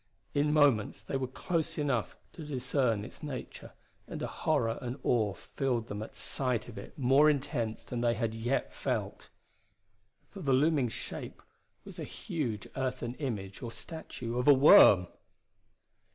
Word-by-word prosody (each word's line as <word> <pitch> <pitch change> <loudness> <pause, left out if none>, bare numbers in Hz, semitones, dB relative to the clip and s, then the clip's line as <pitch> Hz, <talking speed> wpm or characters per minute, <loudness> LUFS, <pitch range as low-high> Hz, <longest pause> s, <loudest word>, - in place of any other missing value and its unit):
In 150 +1 +2
moments 130 -9 +3
they 120 - -4
were 135 -1 -1
close 165 +5 -2
enough 140 -7 -1 0.2
to 165 - -8
discern 125 -6 0
its - - -11
nature, 145 -5 -7 0.3
and - - -6
a - - -1
horror 120 -7 0
and 125 +1 -4
awe 105 -5 +1
filled 120 -4 -2
them 105 +1 -4
at 110 - -8
sight 125 -5 -1
of 120 - -10
it - - -12
more 135 +3 +5
intense 120 -6 -1
than 120 -1 -4
they 120 -1 +2
had 110 0 -1
yet 115 +4 -1
felt. - - -3 1.0
For 200 - -10
the 135 -5 +1
looming 140 -2 +3
shape - - -7 0.4
was - - -9
a - - -3
huge 120 - -4
earthen 125 -2 -2
image 100 -8 -4
or 120 -3 -5
statue 125 -6 -6
of 125 - -1
a 145 - +9
worm! 105 -9 +8
125 Hz, 155 wpm, -31 LUFS, 115-145 Hz, 1.0 s, a